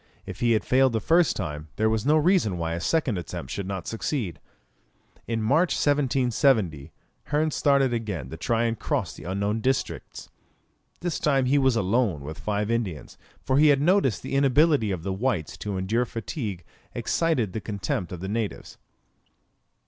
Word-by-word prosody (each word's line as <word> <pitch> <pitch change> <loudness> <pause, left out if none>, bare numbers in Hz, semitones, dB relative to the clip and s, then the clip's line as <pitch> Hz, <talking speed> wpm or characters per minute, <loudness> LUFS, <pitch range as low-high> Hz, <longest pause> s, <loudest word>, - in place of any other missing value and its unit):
If 95 -1 -8
he 120 -1 +3
had 110 - 0
failed 130 -1 +3
the 110 - +1
first 165 +6 +3
time, 75 -5 -5
that 110 - +1
was 110 +2 0
no 155 +1 +5
reason 155 - +2
why 85 -1 -2
a 85 - -3
second 125 - 0
attempt 85 - -7
should 100 -2 -4
not 95 -3 -4
succeed. 115 - -3 0.9
In 115 -1 -1
March, 155 +10 +3
1770, 125 - +1 0.3
Hearn 155 +1 0
started 140 -3 +2
again 100 - -4
to - - -5
try 115 +8 0
and 115 -1 -1
cross - - -2
the 75 - -12
unknown 100 +4 -1
districts. 130 +3 -3 0.7
This 175 -3 -2
time 135 -3 +2
he 140 +3 +3
was 130 -3 +3
alone 105 - +1
with 75 +3 -7
five 105 +1 -1
Indians, 105 -10 -3 0.2
for 130 +1 +2
he 155 - +6
had 145 -2 +5
noticed 165 - +2
that - - -6
the - - -5
inability 140 -3 +3
of 90 -4 -3
the 95 - -2
whites 95 - -1
to 100 -2 -4
endure 110 +7 0
fatigue 110 - -5 0.3
excited 140 - 0
the 110 - -3
contempt 95 -4 -3
of 90 -2 -7
the 95 - -4
natives. 110 0 -4
115 Hz, 175 wpm, -25 LUFS, 95-135 Hz, 0.9 s, he